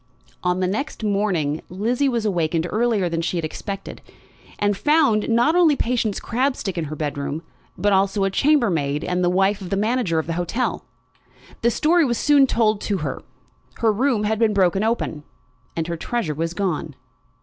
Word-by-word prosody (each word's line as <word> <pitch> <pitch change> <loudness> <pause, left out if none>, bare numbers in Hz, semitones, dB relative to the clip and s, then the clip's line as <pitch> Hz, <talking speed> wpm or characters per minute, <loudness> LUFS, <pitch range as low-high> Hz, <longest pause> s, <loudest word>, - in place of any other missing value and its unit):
On 180 +1 0
the 185 - +1
next 220 +6 -3
morning 195 -8 0
Lizzie 240 +9 0
was 235 -3 -1
awakened 165 -4 0
earlier 220 -4 +1
than 165 -1 -2
she 175 +1 -2
had 165 - -1
expected, 195 +5 -6 0.6
and 205 0 +1
found, 280 -4 +2
not 240 +8 +3
only 335 -5 +5
Patience 235 -5 -1
Crabstick 245 -6 -1
in 170 -2 -2
her 155 +1 -6
bedroom, 145 +1 -3 0.3
but 205 +3 +2
also 195 +1 +2
a 195 - +1
chambermaid, 180 - +2
and 180 0 -1
the 175 - +3
wife 195 +3 +2
of 185 - -6
the 195 - 0
manager 215 -5 0
of 160 - 0
the 165 - -3
hotel. 175 +9 -2 0.8
The 235 - +3
story 325 +8 +3
was 240 -5 0
soon 285 -2 +4
told 215 -4 +1
to 205 - -1
her. - - -4 0.5
Her 225 -2 +2
room 240 -1 +1
had 220 +1 0
been 220 -3 +2
broken 190 +1 +2
open, 220 -9 -1 0.5
and 165 - -1
her 170 0 -4
treasure 205 -3 -2
was 165 +3 -3
gone. 165 -6 -2
200 Hz, 180 wpm, -22 LUFS, 170-235 Hz, 0.8 s, only